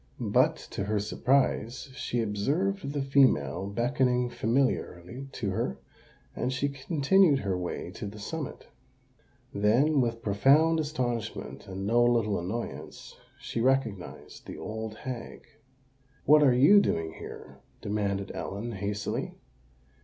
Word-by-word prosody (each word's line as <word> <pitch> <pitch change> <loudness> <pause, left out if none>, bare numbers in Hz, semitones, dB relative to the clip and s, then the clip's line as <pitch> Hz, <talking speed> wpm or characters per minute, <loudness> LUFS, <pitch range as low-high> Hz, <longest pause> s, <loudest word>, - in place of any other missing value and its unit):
But, - - +4 0.2
to 100 - -3
her 105 +1 0
surprise, 125 +3 0
she 120 -1 -2
observed 140 - -1
the 145 -2 -1
female 100 - +3
beckoning 125 +2 +1
familiarly 120 -1 -1
to 100 -5 -2
her; - - -2 0.6
and 125 - -1
she 135 +2 0
continued 145 +3 +3
her 95 -2 -1
way 90 -1 -4
to - - -6
the 105 +1 -9
summit. 145 +8 -6 0.8
Then, 125 +9 +3
with 115 -1 -2
profound 140 +11 +4
astonishment 120 -7 -3
and 95 0 -5
no 120 +3 +4
little 115 -5 +2
annoyance, 105 +7 -6 0.2
she 115 - -4
recognised 130 -7 -1
the - - -7
old 110 0 -5
hag. 125 +1 -7 0.8
"What 150 +1 +7
are 140 -3 +6
you 145 +11 +7
doing 80 - -1
here?" - - -10 0.2
demanded 100 -1 -2
Ellen, 105 +4 -5
hastily. 105 0 -3
120 Hz, 125 wpm, -28 LUFS, 105-135 Hz, 0.8 s, What